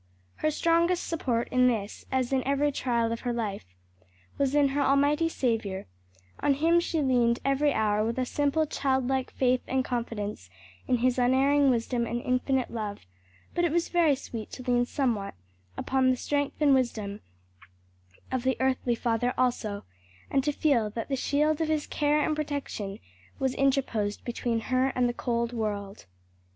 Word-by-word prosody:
Her 310 - +1
strongest 335 +3 +2
support 245 -8 -1
in 255 0 +4
this, 220 -4 -2
as 260 0 0
in 260 -1 +2
every 280 +2 +1
trial 235 -4 0
of 230 - -4
her 245 - -2
life, 210 - -3 0.7
was 280 0 +1
in 285 -2 +4
her 285 +1 0
almighty 285 +4 +3
Saviour; 225 -9 -1 0.5
on 280 - +2
Him 330 +4 +3
she 330 -3 -1
leaned 240 -3 +3
every 275 +2 +2
hour 215 -3 +1
with 230 +2 -2
a 255 - +1
simple 290 +4 +1
childlike 265 -2 0
faith 255 -1 +1
and 260 0 0
confidence 210 - -4 0.4
in 250 - +2
His 255 0 +2
unerring 270 +3 +4
wisdom 235 0 0
and 240 +1 -2
infinite 255 +1 0
love; 210 - -5 0.5
but 345 - 0
it 340 - +2
was 340 +1 0
very 335 -5 +3
sweet 230 -5 -7
to 255 - -7
lean 245 -1 +2
somewhat 235 - -1 0.4
upon 260 -1 +1
the 255 - +2
strength 285 +2 -1
and 295 -2 +5
wisdom 215 -6 -1 1.1
of 260 -1 0
the 260 +1 0
earthly 260 -2 +1
father 235 +1 0
also, 220 -5 -1 0.5
and 270 -1 +2
to 295 - +1
feel 270 -8 +2
that 225 +4 -5
the 275 - +1
shield 300 +4 +1
of 320 - +1
his 310 -1 0
care 300 0 +1
and 305 +1 0
protection 280 -10 -4 0.4
was 265 -1 0
interposed 260 -7 0
between 235 -1 -1
her 255 +3 +1
and 250 -1 +2
the 240 - -1
cold 235 -1 -1
world. 205 - -4
255 Hz, 165 wpm, -28 LUFS, 235-285 Hz, 1.1 s, and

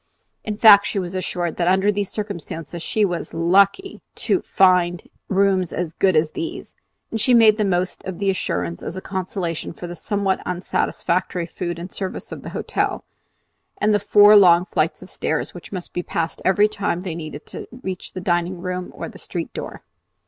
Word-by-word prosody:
In 210 -1 -4
fact, 210 -2 +8
she - - -3
was 180 -2 -3
assured 180 -2 -2
that 175 - 0
under 190 +3 +3
the 205 0 -1
circumstances 175 -5 -6
she 210 +5 +1
was 175 -3 -4
lucky 195 - +2 0.3
in 370 - +3
finding 180 -2 +2 0.2
rooms 190 -3 +2
as 170 -2 -3
good 190 0 +2
as 155 0 +2
these; 335 0 -6 0.4
and 225 - -2
she 250 +1 +4
made 220 -2 +6
the - - +3
most 185 -2 -1
of 185 -2 -5
the 200 -1 +1
assurance 85 - -3
as 180 - -5
a - - -2
consolation 185 -4 -4
for 175 - -8
the 175 0 -6
somewhat 200 0 -1
unsatisfactory 180 0 -1
food 175 0 -5
and 175 +2 -7
service 190 -2 -5
of - - -7
the - - -7
hotel, - - -2 0.7
and 210 0 +2
the 205 - +3
four 205 +1 +7
long 180 -3 +7
flights - - -1
of - - -10
stairs - - -2
which - - -11
must 185 -3 -6
be 175 - -1
passed 165 -1 -3
every 205 +2 +4
time 200 -4 -2
they 180 -3 -4
needed 155 -2 -7
to - - -8 0.2
reach 185 -1 -5
the 185 - -5
dining 175 +1 0
room 180 0 -4
or - - -5
the - - -12
street - - -5
door. - - -7
185 Hz, 190 wpm, -22 LUFS, 175-200 Hz, 0.7 s, fact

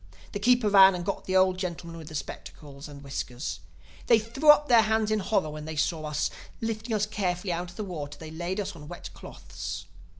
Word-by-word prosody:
The 205 - -4
keeper 245 +1 +4
ran 195 -2 +8
and 175 -1 -4
got - - -3
the 185 - -1
old 185 0 +3
gentlemen 170 -2 -5
with 155 -1 -6
spectacles 145 -1 -8
and 145 -1 -11
whiskers. 125 - -4 0.5
They 230 - +7
threw 235 +8 0
up 295 0 +8
their 235 -4 +7
hands 220 0 +1
in 215 - +2
horror 190 -5 0
when 150 0 -7
they 160 0 -5
saw 155 +1 0
us. 150 -1 -1 0.3
Lifting 225 0 -2
us 210 0 +2
carefully 185 -3 -2
out 175 +1 -3
of 175 - -13
the 215 - -4
water 155 -7 -6
they 160 -1 -9
laid 175 +5 -3
us 200 - -3
on 150 -2 -11
wet 175 +2 -8
cloths. 85 0 -7
180 Hz, 210 wpm, -28 LUFS, 155-215 Hz, 0.5 s, ran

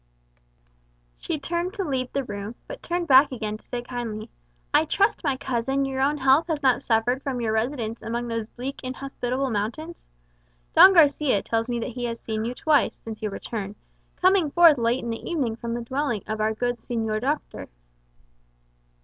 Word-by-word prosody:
She - - -3
turned 345 +6 -3
to 395 - -2
leave 260 -6 -2
the 275 - -1
room, 205 -1 -6
but - - -8
turned 345 0 -2
back 275 +2 +7
again 215 -4 -4
to - - -27
say 240 -1 -5
kindly, 235 -4 -5 0.4
"I - - +5
trust, 405 - +1
my 275 -4 0
cousin, 270 +1 -1
your 265 -1 -2
own 290 +2 +2
health 270 +4 +4
has 310 -3 -2
not 260 -2 +3
suffered 240 +3 +1
from 270 -4 -3
your 225 -2 -1
residence 230 0 -2
among 235 +1 -3
those 230 -2 -3
bleak 260 +4 -6
inhospitable 255 0 -3
mountains? 240 +11 -4 0.7
Don 385 0 +9
Garçia 290 - +4
tells 225 +1 -1
me 240 -1 -2
he 245 0 -4
has 230 -1 -4
seen 220 0 -3
you 245 +2 -3
twice, 300 +1 +2
since 220 -1 -7
your 215 - -1
return, 205 0 -5 0.4
coming 370 -4 +3
forth 325 -3 +6
late 235 +2 +1
in 235 - -3
the 225 - -5
evening 270 -10 -1
from 235 0 -4
the 240 - -4
dwelling 260 -3 -2
of 215 0 -3
our 220 +1 +1
good 245 +1 -1
Señor 220 -2 -2
Doctor." 290 +4 -3
250 Hz, 180 wpm, -25 LUFS, 225-285 Hz, 0.7 s, Don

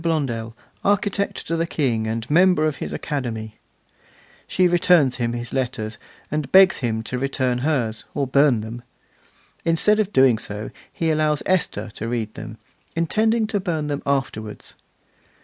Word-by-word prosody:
Blondel, 125 -9 -2 0.3
architect 200 0 0
to 165 - -1
the 165 0 0
King, 120 -9 0
and 115 +1 -3
member 175 +1 +4
of 155 -2 -1
his - - -5
Academy'; 110 -6 -4 0.9
she 185 -1 +3
returns 175 -6 +4
him 120 -2 -1
his 120 0 -5
letters, 120 -4 -2 0.3
and 150 -2 -2
begs 190 0 +7
him 110 -3 -2
to 125 +2 -4
return 130 -2 0
hers, 125 -6 -1
or 140 - +1
burn 135 -3 +3
them. 115 +3 -7 0.8
Instead 170 +6 +3
of 210 -2 0
doing 130 - +4
so 105 0 -5 0.2
he 165 -1 0
allows 155 -1 +1
Esther 185 -11 0
to 110 - -5
read 115 -2 -2
them, 110 0 -8 0.4
intending 220 +7 +2
to 210 -1 -1
burn 165 -5 -2
them 145 -1 -3
afterwards. 120 -6 -3
140 Hz, 150 wpm, -22 LUFS, 115-165 Hz, 0.9 s, begs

